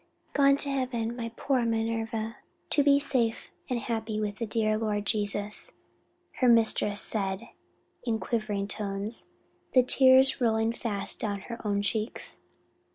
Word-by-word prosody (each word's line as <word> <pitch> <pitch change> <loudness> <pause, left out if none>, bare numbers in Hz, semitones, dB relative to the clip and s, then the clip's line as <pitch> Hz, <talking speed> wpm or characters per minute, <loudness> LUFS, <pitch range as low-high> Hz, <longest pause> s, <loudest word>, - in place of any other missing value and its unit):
"Gone 275 -1 +5
to 280 - +2
heaven, 245 -4 -2
my 230 -1 -5
poor 265 -3 +1
Minerva, 225 0 -2 0.3
to 295 - +5
be 280 0 +5
forever 285 - -2
safe 235 -4 0 0.2
and 250 - 0
happy 225 -2 -3
with 210 -1 -3
the 230 - -2
dear 215 0 +1
Lord 210 -2 -1
Jesus," 210 - -1 0.7
her 255 - +4
mistress 220 -3 +3
said 195 +1 -1 0.5
in 230 -2 0
quivering 215 -4 -2
tones, 205 +2 -4 0.5
the 255 - +7
tears 260 +1 +6
rolling 225 -1 +2
fast 210 -4 -2
down 200 -2 -2
her 235 +3 -8
own 200 -1 0
cheeks. 215 +2 -2
225 Hz, 145 wpm, -28 LUFS, 210-240 Hz, 0.7 s, the